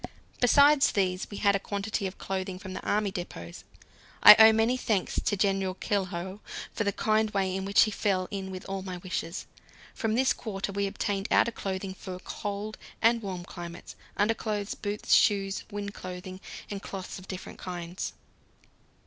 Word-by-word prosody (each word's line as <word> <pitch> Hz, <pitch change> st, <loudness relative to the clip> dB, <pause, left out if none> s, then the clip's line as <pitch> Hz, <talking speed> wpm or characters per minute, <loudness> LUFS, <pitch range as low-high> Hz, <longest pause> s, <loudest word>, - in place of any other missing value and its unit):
Besides 280 Hz, +3 st, +6 dB
these 185 Hz, -2 st, 0 dB
we 205 Hz, -, -7 dB
had 200 Hz, -1 st, +3 dB
a -, -, +1 dB
quantity 200 Hz, +1 st, -2 dB
of 185 Hz, -, -8 dB
clothing 190 Hz, -1 st, -3 dB
from 185 Hz, 0 st, -8 dB
the -, -, -5 dB
army 205 Hz, -1 st, +1 dB
depots. 85 Hz, -, -7 dB, 0.6 s
I 210 Hz, -, +14 dB
owe 220 Hz, 0 st, +10 dB
many 225 Hz, +3 st, +2 dB
thanks 220 Hz, -6 st, 0 dB
to 205 Hz, -, 0 dB
General 195 Hz, -1 st, +1 dB
Keilhau 190 Hz, -1 st, -2 dB, 0.3 s
for 220 Hz, -, -1 dB
the 200 Hz, -, +1 dB
kind 215 Hz, +2 st, +1 dB
way 195 Hz, -2 st, 0 dB
in 190 Hz, 0 st, -3 dB
which 200 Hz, +1 st, +5 dB
he 215 Hz, -, 0 dB
fell 190 Hz, -3 st, 0 dB
in 195 Hz, -2 st, -4 dB
with 185 Hz, -1 st, -7 dB
all 195 Hz, 0 st, -3 dB
my 185 Hz, -1 st, -5 dB
wishes. 175 Hz, -1 st, -4 dB, 0.5 s
From 225 Hz, -2 st, -1 dB
this 260 Hz, +2 st, +3 dB
quarter 200 Hz, -2 st, -4 dB
we 200 Hz, 0 st, 0 dB
obtained 195 Hz, +1 st, -2 dB
outer 235 Hz, -, +4 dB
clothing 190 Hz, -3 st, -4 dB
for 190 Hz, 0 st, -8 dB
both 180 Hz, -, -9 dB
cold 205 Hz, +1 st, -4 dB, 0.2 s
and 230 Hz, +1 st, +4 dB
warm 185 Hz, -4 st, -5 dB
climates, 175 Hz, -1 st, -9 dB, 0.2 s
underclothes, 210 Hz, -1 st, 0 dB
boots, 205 Hz, 0 st, -2 dB
shoes, 195 Hz, -1 st, +3 dB
wind 205 Hz, 0 st, -4 dB
clothing, 185 Hz, 0 st, -8 dB, 0.3 s
and 200 Hz, -1 st, -4 dB
cloths 190 Hz, -1 st, -6 dB
of 185 Hz, -, -14 dB
different 185 Hz, -1 st, -7 dB
kinds. 175 Hz, 0 st, -5 dB
195 Hz, 175 wpm, -28 LUFS, 185-210 Hz, 0.6 s, I